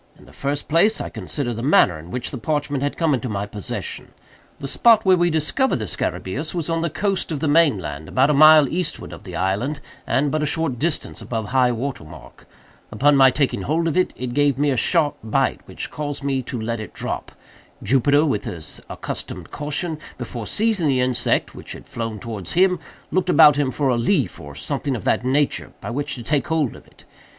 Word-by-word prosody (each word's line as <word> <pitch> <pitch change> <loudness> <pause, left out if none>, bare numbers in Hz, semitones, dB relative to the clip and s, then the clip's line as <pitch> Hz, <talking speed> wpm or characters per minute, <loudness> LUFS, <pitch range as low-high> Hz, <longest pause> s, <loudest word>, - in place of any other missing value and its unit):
In - - -18
the - - -17
first 140 +1 -3
place 170 +8 +3
I - - -4
considered 120 -6 -4
the - - -3
manner 115 - +4
in 80 +3 -12
which 125 +6 -4
the 130 - -5
parchment 145 +1 -1
had 145 0 -2
come 165 -3 +2
into 130 -1 -2
my 100 -1 -2
possession. 100 -1 -6 0.4
The 140 - -6
spot 225 - +4
where 190 -1 +6
we 175 -1 +2
discovered 160 - +1
the 110 - -3
scarabæus 135 - -3
was 170 -1 -2
on 165 0 0
the 170 - 0
coast 195 +3 -1
of 150 - -2
the 155 - -1
main 145 -5 +4
land, 75 -3 -6
about 135 +3 +3
a - - +2
mile 155 0 +8
eastward 165 0 -3
of - - -11
the 90 -3 -7
island, 100 - -1 0.3
and 140 +1 +1
but 155 - 0
a 150 - 0
short 145 -5 -1
distance 165 +1 -2
above 110 -3 -4
high 125 -1 +3
water 120 - -4
mark. 75 0 -14 0.4
Upon 145 +1 +3
my 135 -1 +7
taking 135 +1 0
hold 165 +3 0
of 165 - -1
it, 185 0 +2
it 125 -1 -5
gave 145 -1 +2
me 145 0 +2
a - - +1
sharp 150 +5 +1
bite, 110 - 0
which - - -6
caused 145 -1 -4
me 135 -2 0
to 125 -1 -5
let 115 +1 -3
it 105 -4 -8
drop. - - -4 0.5
Jupiter, 145 +3 +3
with 105 -9 -1
his 80 -3 -7
accustomed - - -6
caution, 150 +2 -3 0.2
before 120 -2 -6
seizing 215 -7 +1
the 135 -2 +2
insect, 125 -1 +1
which - - -8
had - - -11
flown 115 -2 -5
towards 105 -4 -5
him, 180 0 +3 0.3
looked 185 -1 0
about 155 -5 +7
him 145 -2 +1
for 135 +2 0
a 125 - +2
leaf, 130 - +1
or 70 -1 -10
something 135 - -2
of 110 - -6
that - - +1
nature, 140 +3 0
by - - -6
which 140 +4 -2
to 120 - -8
take 145 +4 0
hold 155 -5 0
of - - -15
it. - - -22
140 Hz, 215 wpm, -22 LUFS, 120-155 Hz, 0.5 s, mile